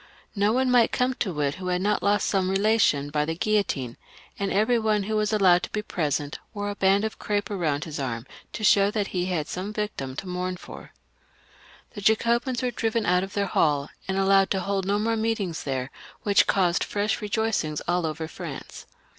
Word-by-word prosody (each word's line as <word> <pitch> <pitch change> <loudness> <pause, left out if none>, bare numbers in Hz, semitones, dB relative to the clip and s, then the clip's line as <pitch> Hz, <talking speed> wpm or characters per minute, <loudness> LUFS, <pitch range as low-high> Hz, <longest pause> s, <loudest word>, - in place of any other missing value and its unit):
No 205 +1 +2
one 255 +2 +2
might 245 -2 +5
come 250 +1 +1
to 175 -9 -1
it 140 -1 +1
who 185 - -4
had 180 0 +1
not 210 +1 +1
lost 205 +1 +2
some 190 -2 +1
relation 195 -8 +2
by 150 0 +1
the 165 +2 -2
guillotine, 175 - -1 0.4
and 200 -1 -1
every 220 +4 +3
one 215 -2 +1
who 215 +2 -2
was 215 0 +1
allowed 185 -4 +5
to - - -5
be 210 - -3
present 145 -6 -2 0.2
wore 205 0 -2
a - - -6
band 195 +2 +3
of 220 - -5
crape 205 0 -2
round 155 -7 -1
his 155 -2 -6
arm, 120 -3 -3 0.3
to 215 - -5
show 200 -1 +5
that 205 -1 -2
he 180 -1 -1
had 165 -5 -1
some 190 +3 -4
victim 210 -12 -4
to 185 - -6
mourn 180 0 -3
for. - - -11 1.0
The 205 - -8
Jacobins 235 +4 +2
were 250 - 0
driven 225 -1 -1
out 180 0 +3
of 195 - -7
their 200 -1 0
hall, 145 -6 +1 0.2
and 190 0 -1
allowed 195 0 +4
to 190 - 0
hold 195 0 -1
no 200 +1 +2
more 225 +2 0
meetings 220 -7 -2
there, 130 -1 -2 0.3
which 205 -1 +4
caused 180 -3 +2
fresh 205 +1 -1
rejoicings 210 -8 -1
all 175 -1 +1
over 160 +1 -4
France. - - -8
195 Hz, 205 wpm, -25 LUFS, 170-215 Hz, 1.0 s, might